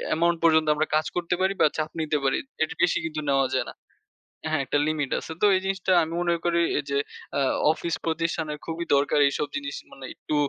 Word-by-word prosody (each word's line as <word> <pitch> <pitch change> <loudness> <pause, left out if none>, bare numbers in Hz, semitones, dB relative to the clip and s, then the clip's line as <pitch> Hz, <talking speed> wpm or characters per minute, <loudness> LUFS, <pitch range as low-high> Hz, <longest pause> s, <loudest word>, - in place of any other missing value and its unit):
amount 170 +1 +2
পর্যন্ত 160 -1 +4
আমরা 155 +1 0
কাজ 155 - +2
করতে 175 0 0
পারি 190 +1 +2
বা - - +7
চাপ 155 0 -1
নিতে 150 -1 0
পারি, 135 - +2 0.3
এর 160 - -3
বেশি 175 - +3
কিন্তু 155 -1 -3
নেওয়া 135 -1 +3
যায় - - +1
না। - - -9 0.8
হ্যাঁ, 155 -2 +1
একটা 145 - 0
limit 150 -3 -1
আছে। - - -9
তো - - +5
এই 185 - +1
জিনিসটা 190 -1 -1
আমি 160 - -5
মনে 170 -1 +2
করি 170 0 +2 0.2
এই - - -3
যে 140 - +1 0.4
আ - - +2 0.3
অফিস 165 0 -2
প্রতিষ্ঠানে 165 -1 -1
খুবই 165 +1 -3
দরকার 140 +1 +2
এইসব 145 +1 -1
জিনিস 140 0 -4 0.2
মানে 135 -1 -10
একটু 150 - -4
155 Hz, 210 wpm, -25 LUFS, 150-170 Hz, 0.8 s, বা